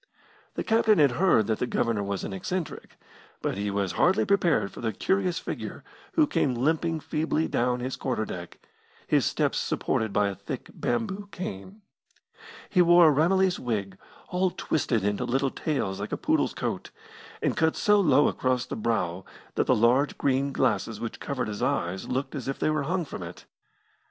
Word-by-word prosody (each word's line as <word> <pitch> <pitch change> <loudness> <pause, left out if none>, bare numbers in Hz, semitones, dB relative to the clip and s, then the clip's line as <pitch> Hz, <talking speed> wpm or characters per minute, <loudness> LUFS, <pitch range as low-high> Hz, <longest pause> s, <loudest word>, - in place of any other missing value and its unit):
The - - -2
captain 220 -2 +3
had 145 -4 +5
heard 145 - +3
that 110 0 -1
the 125 - 0
Governor 115 -4 0
was 100 -1 -3
an - - -4
eccentric, 175 - -5 0.4
but - - -2
he 100 +1 -2
was 100 -2 -1
hardly 185 +2 +3
prepared 180 - +2
for - - -10
the 115 -1 0
curious 185 - 0
figure - - -6 0.3
who 315 - +4
came 135 - 0
limping 160 +5 0
feebly 155 +1 -1
down 125 +1 0
his 130 +1 -3
quarter 125 -5 -2
deck, 90 -3 -7 0.5
his - - +2
steps - - 0
supported 110 -2 -1
by 105 0 +2
a 100 - -2
thick - - -7
bamboo 190 - -2
cane. 185 - -7 0.8
He 180 - +3
wore 175 -2 +7
a - - +2
Ramillies 185 +4 +3
wig, 105 -6 -3 0.3
all 185 +1 +1
twisted 130 - -1
into 105 0 0
little 135 +2 0
tails 120 -11 -2
like - - -5
a - - -1
poodle's - - +1
coat, - - -3 0.5
and - - 0
cut 160 0 +2
so 210 0 +4
low 145 -6 +5
across 130 -1 0
the - - -5
brow 95 -6 -1 0.3
that - - 0
the - - +4
large 125 +6 +3
green 140 +1 +1
glasses 110 -5 0
which 115 - -5
covered 135 -4 -3
his 105 -1 -5
eyes 90 +2 -1
looked 130 +2 -2
as 135 -5 -5
if 135 - -2
they 155 - +1
were 155 -1 0
hung 180 -2 0
from 120 - -7
it. 85 0 -9
130 Hz, 180 wpm, -27 LUFS, 110-170 Hz, 0.8 s, wore